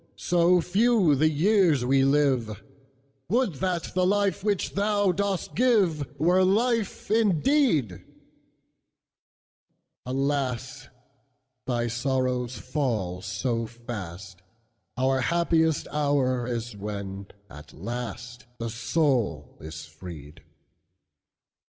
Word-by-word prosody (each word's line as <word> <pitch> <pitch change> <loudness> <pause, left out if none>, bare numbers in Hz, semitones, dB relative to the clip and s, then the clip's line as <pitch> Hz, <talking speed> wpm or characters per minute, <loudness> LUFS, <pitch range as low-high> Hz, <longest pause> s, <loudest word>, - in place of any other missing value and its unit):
so 175 +1 +3
few 200 -2 +3
the 155 +3 +3
years 165 - +3
we 135 +1 +3
live, 135 -7 +1 0.7
Would 235 -2 +1
that 180 -3 -2
the 185 - +1
life 200 0 +1
which 205 -3 -1
thou 205 -1 +2
dost 200 0 -2
giveWere 180 - +2
life 220 +2 0
indeed! 215 - +2 2.0
Alas! 135 -2 -2 0.8
thy 120 -2 0
sorrows 125 0 -1
fall 110 - -2
so 115 +6 -2
fast, 100 -6 -8 0.6
Our 130 +1 +1
happiest 165 +1 +1
hour 140 -4 +1
is 120 -2 -4
when 100 -1 -6 0.2
at 75 -4 -12
lastThe 120 - -7
soul 115 - 0
is 80 0 -8
freed. 80 -2 -11
135 Hz, 90 wpm, -26 LUFS, 115-180 Hz, 2.0 s, so